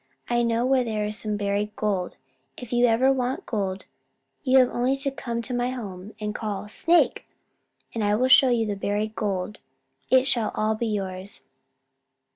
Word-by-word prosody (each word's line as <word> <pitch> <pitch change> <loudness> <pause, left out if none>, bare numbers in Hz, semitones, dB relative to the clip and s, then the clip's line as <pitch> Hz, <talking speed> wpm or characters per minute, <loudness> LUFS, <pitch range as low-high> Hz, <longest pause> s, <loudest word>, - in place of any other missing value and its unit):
I 240 0 +3
know 235 0 +1
where 260 -1 +3
there 215 -3 -2
is 210 0 -3
some 210 -1 -2
buried 205 +1 -1
gold. 195 -4 -2 0.4
If 245 -1 -8
ever 240 +1 +4
you - - +5
want 255 0 -2
gold, 195 -3 -3 0.6
you 265 -2 +4
have 255 -1 +5
only 250 +3 +1
to 275 0 -2
come 235 -3 -4
to 250 - -5
my 245 0 0
home 205 -5 -7
and 210 -1 -3
call, 210 -2 -4
'Snake!' 335 +10 +2 0.7
and 225 - -2
I 205 0 +2
will 255 +4 +2
show 260 0 +7
you 235 -2 +2
the 210 - -1
buried 205 +2 -2
gold. 200 -1 -2 0.5
It 260 0 +5
shall 230 -5 +1
all 215 0 +1
be 225 +2 -2
yours." 195 -2 -3
220 Hz, 180 wpm, -25 LUFS, 205-250 Hz, 0.7 s, show